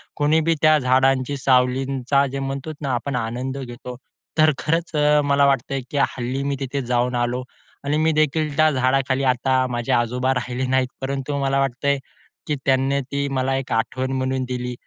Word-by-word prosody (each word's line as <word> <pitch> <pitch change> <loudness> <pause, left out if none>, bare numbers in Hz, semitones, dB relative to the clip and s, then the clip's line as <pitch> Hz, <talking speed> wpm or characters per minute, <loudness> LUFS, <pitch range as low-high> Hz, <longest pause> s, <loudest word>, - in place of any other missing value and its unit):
कोणीबी 160 +2 +2
त्या 155 -1 +6
झाडांच्या 130 +1 +2
सावलींचा 130 +1 +2
जे 135 +1 -4
म्हणतो 135 +3 -4
ना, 135 -3 -1
आपण 130 +3 -2
आनंद 130 +4 -4
घेतो. 125 -1 -7 0.4
तर 155 0 +5
खरंच 165 +1 -1
अ, 150 0 +4
मला 140 0 +3
वाटतं 135 0 +1
की 145 - -2 0.2
हल्ली 130 +3 -2
मी 140 0 -1
तिथे 135 +1 -3
जाऊन 125 +1 +1
आलो 125 +1 -3 0.4
आणि 145 +2 0
मी 160 +1 +2
देखील 155 -1 +1
त्या 155 0 +5
झाडाखाली. 130 0 +1
आता 130 +1 +1
माझे 120 -1 -2
आजोबा 125 +3 +1
राहिले 125 +1 -2
नाहीत, 130 0 +2
परंतु 135 +1 -3
मला 135 0 +1
वाटतंय 135 +1 0 0.5
की 150 - 0
त्यांनी 135 +1 +2
ती 140 +2 -3
मला 130 +1 0
एक 135 - -5
आठवण 130 +4 -1
म्हणून 130 0 -1
दिली 125 -1 -3
135 Hz, 170 wpm, -22 LUFS, 130-140 Hz, 0.5 s, त्या